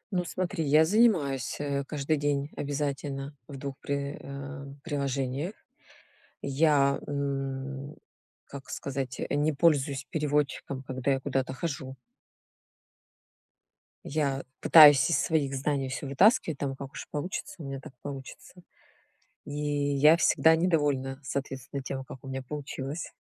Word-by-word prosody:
Ну, 180 - +1
смотри, 185 -1 -2
я 150 +3 +5
занимаюсь, 160 - +2
э, 140 -1 -1
каждый 150 +1 -1
день 145 0 -1
обязательно 140 0 -3
в 140 - -8
двух 135 0 -5
при 140 0 -3
э, 140 0 -7 0.2
приложениях. 140 +2 -2 0.9
Я, 140 -1 +3
м, 135 0 -3 0.5
как 140 -1 -10
сказать, 135 -1 -4
э, - - -3
не 150 +1 +2
пользуюсь 145 -3 +2
переводчиком, 145 -3 -1
когда 130 +1 -1
я 135 - +1
куда-то 130 -1 -1
хожу. 135 -3 -4 2.1
Я 140 -2 -1 0.2
пытаюсь 145 -3 +8
из - - +3
своих 145 -4 +1
знаний 135 0 -1
всё 135 +2 -4
вытаскивать, 170 - +4
там, 135 -1 -2
как 135 0 -8
уж - - -8
получится 155 +6 -4
у - - -7
меня, 135 -1 -5
так 135 - -12
получится. 135 +4 -8 0.9
И - - -8
я 145 +1 +3
всегда 160 0 +5
недовольна, 145 -6 +1
соответственно, 135 0 -4
тем, 135 0 -4
как 130 - -10
у - - -9
меня 135 0 -4
получилось. 145 +2 -5
140 Hz, 130 wpm, -28 LUFS, 135-150 Hz, 2.1 s, пытаюсь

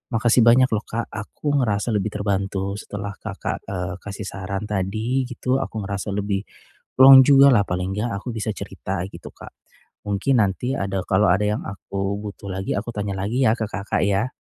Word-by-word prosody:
Makasih 120 +2 +3
banyak 130 +2 +6
loh, 105 -1 0
Kak. 115 +1 -3
Aku 145 +7 -3
ngerasa 110 -1 0
lebih 105 +1 0
terbantu 100 -1 -2
setelah 100 0 -6
Kakak, 100 -2 -5
eee, 90 -2 -4
kasih 100 0 -6
saran 95 +1 -5
tadi 110 +7 -1
gitu, 125 +1 -1
aku 110 -6 -4
ngerasa 100 +1 -4
lebih, 100 -1 -1 0.6
plong 135 0 +11
jugalah, 135 -5 +6
paling 90 0 -3
enggak 115 +3 -1
aku 125 - -6
bisa 110 0 -3
cerita 95 -2 -5
gitu, - - -11
Kak. - - -13 0.5
Mungkin 110 +5 +2
nanti 125 +7 -2
ada 95 -4 -2
kalau 100 +2 +3
ada 105 +3 +2
yang 105 +1 0
aku 100 0 -4
butuh 100 -1 -8
lagi, 95 +1 -3
aku 105 +4 -3
tanya 100 -1 -2
lagi 115 +7 0
ya 110 - +5
ke 110 - -2
Kakak 100 -1 -2
ya? 100 +5 +1
105 Hz, 180 wpm, -22 LUFS, 100-115 Hz, 0.6 s, plong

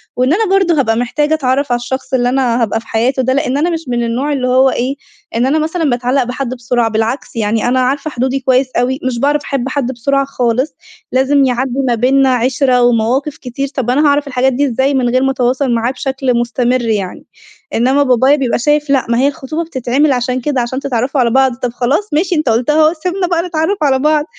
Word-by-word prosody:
وإن 255 +4 +2
أنا 440 +5 +1
برضه 365 -6 +2
هابقى 225 -4 +1
محتاجة 295 +5 0
أتعرف 275 -2 0
على 240 - +1
الشخص 260 +2 -5
اللي 245 -1 +2
أنا 250 -2 +1
هابقى 225 0 0
في 225 - -16
حياته 250 +4 0
ده، 260 - +1
لإن 275 -1 0
أنا 320 +4 +1
مش 330 -1 -3
من 240 -1 -1
النوع 250 +6 -1
اللي 255 -3 -1
هو 260 +1 +4
إيه، 260 +2 -2 0.4
إن 235 - +1
أنا 290 +4 +1
مثلًا 320 0 -1
باتعلّق 250 +2 +1
بحد 250 +1 -4
بسرعة 240 -1 0
بالعكس 225 +4 -2
يعني 220 +1 0
أنا 255 +1 +2
عارفة 275 +4 0
حدودي 260 +2 -1
كويس 260 0 +2
أوي، 255 +3 0
مش 245 -2 -2
باعرف 290 +3 +1
أحب 270 -2 -3
حد 265 -2 -2
بسرعة 275 +3 0
خالص، 255 +1 -1 0.4
لازم 270 +2 +2
يعدّي 255 +1 -1
ما 240 - +2
بينا 265 +3 +3
عِشرة 250 +1 +1
ومواقف 245 +5 +1
كتير 275 +2 -4
طب 260 -4 -4
أنا 290 +5 +2
هاعرف 285 0 +1
الحاجات 260 0 +1
دي 285 +4 +1
إزاي 265 +3 0
من 255 -2 +1
غير 255 +2 +1
ما 270 - +2
اتواصل 255 +1 0
معاه 235 +2 0
بشكل 270 -1 -2
مستمر 240 +1 0
يعني، 210 -5 -3 0.5
إنما 260 +5 +2
بابايا 260 +2 +3
بيبقى 260 -5 -1
شايف 295 +3 +1
لأ 275 -2 +2
ما 235 - +1
هي 270 - +3
الخطوبة 290 +3 -4
بتتعمل 280 -1 0
عشان 250 0 -1
كده 270 -2 -1
عشان 255 +3 -3
تتعرّفوا 265 0 -1
على 235 - +2
بعض، 265 -1 +2
طب 250 -1 -3
خلاص 280 +13 -1
ماشي 345 +4 +1
أنت 305 -5 0
قُلتها 235 +6 +1
أهو 320 - +1
سيبنا 365 0 -1
بقى 340 -1 0
نتعرّف 330 +4 -1
على 265 -2 +2
بعض، 300 +1 +2
260 Hz, 215 wpm, -14 LUFS, 245-285 Hz, 0.5 s, هو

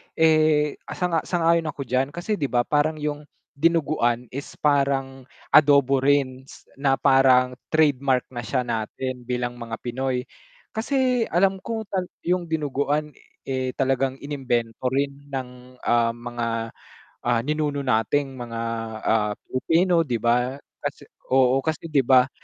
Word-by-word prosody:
eh, 155 -2 +3 0.2
sang-a 175 -2 +1
sang-ayon 170 -2 +2
ako 145 -2 -4
diyan 130 +3 -1
kasi 200 +4 -2
'di 140 - 0
ba 120 -2 +1
parang 150 +4 +1
yung 150 -1 -4 0.2
dinuguan 140 -6 +1
is 140 +2 -7
parang 135 -2 0 0.2
adobo 140 -2 +5
rin 135 -1 +1
s - - -14 0.2
na 135 -1 +3
parang 130 -2 +4
trademark 140 -5 +2
na 120 - -6
siya 125 +3 -1
natin 120 +2 -4
bilang 120 -1 -2
mga 115 -1 -5
Pinoy. 125 +1 -2 0.5
Kasi 250 0 +1
alam 190 +2 +2
ko 225 +3 -4
tal 185 -2 -1 0.2
yung 180 0 0
dinuguan, 150 -1 -1 0.3
eh, 130 -1 -3
talagang 135 0 +1
inimbento 130 -4 -2
rin 140 +2 -2
ng, 125 -2 -7
ah, 115 -1 +2
mga, 120 0 -4 0.8
ah, 120 -1 +2
ninuno 150 +1 -1
nating 135 +3 0
mga, 115 -2 -5 0.4
ah, 105 -2 +1
Pilipino 165 +5 +2
'di 120 -5 -2
ba, 125 +2 +2 0.3
kasi - - -3 0.3
oo, 130 0 +5
kasi 160 +1 -2
'di 140 -4 +2
ba 130 +1 +5
135 Hz, 135 wpm, -24 LUFS, 125-155 Hz, 0.8 s, adobo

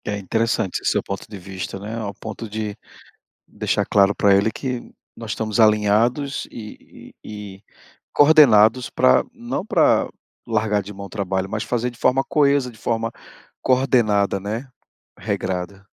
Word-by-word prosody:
É 105 - -2
interessante 110 0 -1
esse - - +1
seu - - 0
ponto 100 -1 -6
de 105 - -8
vista, 95 0 -7
né, 105 +3 -6
ao 105 -3 -4
ponto 110 +1 -7
de 105 -1 -4 0.7
deixar - - -1
claro 100 0 +3
pra 100 -1 +4
ele 100 +3 +3
que 125 0 -4 0.3
nós 115 -2 -7
estamos 110 -1 -2
alinhados 110 +6 +2
e 110 -2 -12
e 105 -2 -8
e 95 - -21 0.5
coordenados 125 -6 +5
pra 65 0 +4
não - - -5
pra - - +3 0.4
largar 110 -2 +1
de 100 +1 -9
mão 100 0 -8
o - - -11
trabalho, 95 -2 -2
mas 110 +1 -3
fazer 125 0 -2
de 120 - -18
forma 135 +1 +2
coesa, 140 -5 +2
de 110 - -18
forma 115 0 -1 0.5
coordenada, 120 -7 +2
né, 110 +7 -5 0.5
regrada. 95 -1 -4
110 Hz, 155 wpm, -21 LUFS, 100-115 Hz, 0.7 s, coordenados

